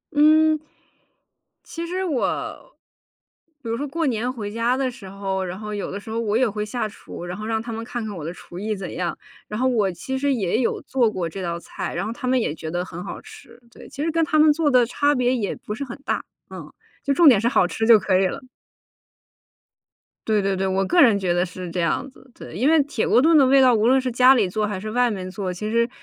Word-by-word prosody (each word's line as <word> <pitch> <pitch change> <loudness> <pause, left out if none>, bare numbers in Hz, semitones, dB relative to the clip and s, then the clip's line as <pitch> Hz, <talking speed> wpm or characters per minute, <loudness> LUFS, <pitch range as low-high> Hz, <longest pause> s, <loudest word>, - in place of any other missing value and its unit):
嗯， 310 +1 +5 1.0
其 335 0 -6
实 370 +2 -2
我， 350 - -3 0.9
比 - - -7
如 230 - 0
说 285 +3 -3
过 325 +3 -2
年 245 +1 -1
回 210 -5 -6
家 230 +3 0
的 265 -1 -1
时 215 -7 -11
候， 195 -1 -3
然 185 0 -5
后 210 -1 -6
有 205 - -4
的 200 - -5
时 220 - -12
候 230 - -2
我 220 -1 0
也 255 -1 +3
会 210 +1 -3
下 215 +1 -3
厨， 190 -4 -10
然 180 +1 -5
后 215 - -6
让 225 -1 0
他 230 0 -7
们 225 +1 -5
看 240 -2 -5
看 210 -2 -6
我 165 - -7
的 165 - -3
厨 175 0 -11
艺 215 +1 -2
怎 190 -2 -7
样。 175 -2 -3 0.3
然 210 +2 -5
后 260 - +2
我 215 -7 +1
其 185 +10 -5
实 280 +1 0
也 205 -1 0
有 245 - 0
做 240 -5 +1
过 180 -4 -3
这 195 +4 -7
道 170 -2 -3
菜， - - -6
然 175 - -2
后 220 - -4
他 255 +1 -6
们 255 0 +3
也 150 - -1
觉 160 0 -7
得 175 +1 -2
很 175 0 -8
好 - - -7
吃。 - - -15
对， - - -14
其 285 - -5
实 325 - 0
跟 330 0 +1
他 310 0 +1
们 305 0 +6
做 305 -1 +1
的 250 -2 +5
差 285 +4 +1
别 250 0 +1
也 210 -5 -2
不 210 - -7
是 280 - -5
很 240 - -8
大。 - - -1 0.3
嗯， - - -9 0.3
就 280 - -1
重 340 +2 +6
点 225 -6 +5
是 230 - +1
好 240 - +3
吃 225 +5 -2
就 230 -2 +9
可 185 -1 +2
以 195 - +3
了。 185 - -6 1.8
对 215 -2 +2
对 195 0 0
对， 190 +1 -1
我 190 0 0
个 350 0 +4
人 220 -8 +5
觉 180 -2 0
得 175 +1 +1
是 180 0 -8
这 175 +1 -2
样 165 - -1
子。 265 - -20
对， - - -11
因 255 - +2
为 320 -2 +5
铁 270 -5 -2
锅 245 - +4
炖 320 +1 +5
的 275 - +6
味 270 +1 +5
道， 255 -2 +6
无 220 0 +2
论 265 +1 +5
是 255 -1 -2
家 250 +2 +6
里 210 -6 +2
做 215 +3 -1
还 205 -2 -4
是 215 +3 -6
外 245 0 +2
面 185 -2 -5
做， 190 -1 -4
其 210 +4 -5
实 235 +1 +1
225 Hz, 275 characters per minute, -22 LUFS, 195-260 Hz, 1.8 s, 就